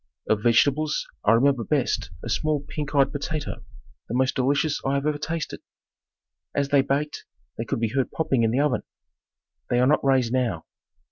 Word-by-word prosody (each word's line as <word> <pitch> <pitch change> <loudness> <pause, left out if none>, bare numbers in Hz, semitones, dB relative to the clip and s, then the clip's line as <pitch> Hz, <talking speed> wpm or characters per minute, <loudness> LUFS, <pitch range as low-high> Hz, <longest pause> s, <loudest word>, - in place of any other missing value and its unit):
Of 110 -1 +2
vegetables 140 +6 +2 0.2
I 105 - +6
remember 130 +1 +3
best 140 0 0
a - - -5
small 145 +5 0
pink 150 0 -5
eyed 140 -1 +4
potato, 145 0 -4 0.5
the 120 - -2
most 130 +1 +2
delicious 140 +3 +1
I 135 +1 0
have 140 +1 -1
ever 150 -1 0
tasted. 160 +1 -4 1.0
As 140 -1 0
they 140 -1 +5
baked, 145 +2 -2 0.3
they - - -4
could - - -2
be 115 -1 0
heard 135 -1 +1
popping 135 -6 0
in 115 - +3
the 125 +5 +1
oven. 145 -4 +1 0.9
They 120 - +2
are 125 - +4
not 150 +4 +3
raised 130 -3 +2
now. 120 -11 0
140 Hz, 180 wpm, -25 LUFS, 125-150 Hz, 1.0 s, I